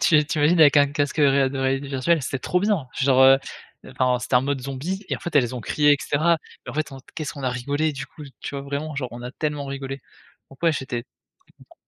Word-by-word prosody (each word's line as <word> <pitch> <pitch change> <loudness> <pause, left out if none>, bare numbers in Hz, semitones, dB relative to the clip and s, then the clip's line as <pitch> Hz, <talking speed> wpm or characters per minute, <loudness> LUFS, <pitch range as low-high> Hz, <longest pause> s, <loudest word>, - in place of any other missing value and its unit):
Tu 155 -2 +4
tu 155 - -2
imagines 160 +4 +4
avec 150 -2 +7
un 145 0 +6
casque, 145 +1 -1
heu, 145 -2 +5
réal 135 -1 +3
de 135 - -5
réalité 135 +1 -1
virtuelle? 140 +4 +1
C'était 135 0 -3
trop 180 - 0
bien! 200 -8 0
Genre, 130 -1 +4
heu, 135 0 +7 0.5
enfin, 130 -1 +1
c'était 125 - -3
un - - +5
mode 140 0 -2
zombie 150 +10 -4
et - - -1
en - - -14
fait 175 - -6
elles 130 -3 +2
ont 125 - -4
crié, 145 +6 +3
et - - +4
cetera, 160 +3 +2 0.3
mais - - -5
en - - -12
fait 155 0 -2
on 135 - -8 0.2
qu'est-ce 155 -3 -5
qu'on 140 - -8
a 130 - 0
rigolé 145 +5 -1
du 135 0 -6
coup, 155 - -13 0.2
tu - - -6
vois, 140 - -4
vraiment 145 +2 -4
genre, 130 -3 -2
on 120 +1 -8
a 125 - -6
tellement 150 -1 -3
rigolé, 135 0 -5 0.5
donc 135 - -16
ouais, 165 -1 +4
j'étais, 130 -4 -4
très - - -36
content. - - -19
140 Hz, 265 wpm, -23 LUFS, 130-150 Hz, 0.5 s, avec